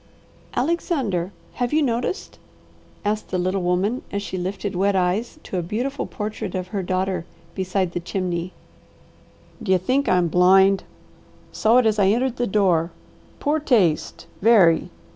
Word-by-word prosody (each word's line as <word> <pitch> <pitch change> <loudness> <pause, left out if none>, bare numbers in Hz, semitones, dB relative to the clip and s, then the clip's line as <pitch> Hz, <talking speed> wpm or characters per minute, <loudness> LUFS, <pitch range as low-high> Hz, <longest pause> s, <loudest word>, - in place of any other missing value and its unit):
"Alexander, 250 - -1 0.2
have 245 -1 -2
you 310 0 +3
noticed?" 245 +7 -2 0.7
asked 210 +1 -1
the 185 - -1
little 185 +2 0
woman 185 +7 0
as 200 0 -2
she 190 - -5
lifted 190 +2 -3
wet 195 +2 +2
eyes 190 - 0
to 185 - -3
a - - -1
beautiful 240 +11 -3
portrait 210 -2 -5
of 185 0 -4
her 200 -3 -2
daughter 185 -1 -1 0.3
beside 185 -1 -1
the 175 - -3
chimney. 175 0 -3 1.1
"D'ye 190 -4 +3
think 255 +10 0
I'm 180 -1 +3
blind? 190 +3 +4 0.7
Saw 225 +3 +3
it 250 - +4
as 215 -1 +2
I 195 - +4
entered 245 +4 +1
the 245 - 0
door. 180 -5 +2 0.5
Poor 300 +1 +1
taste! 210 - +1 0.2
Very! 195 -7 +5
195 Hz, 145 wpm, -22 LUFS, 180-230 Hz, 1.1 s, Very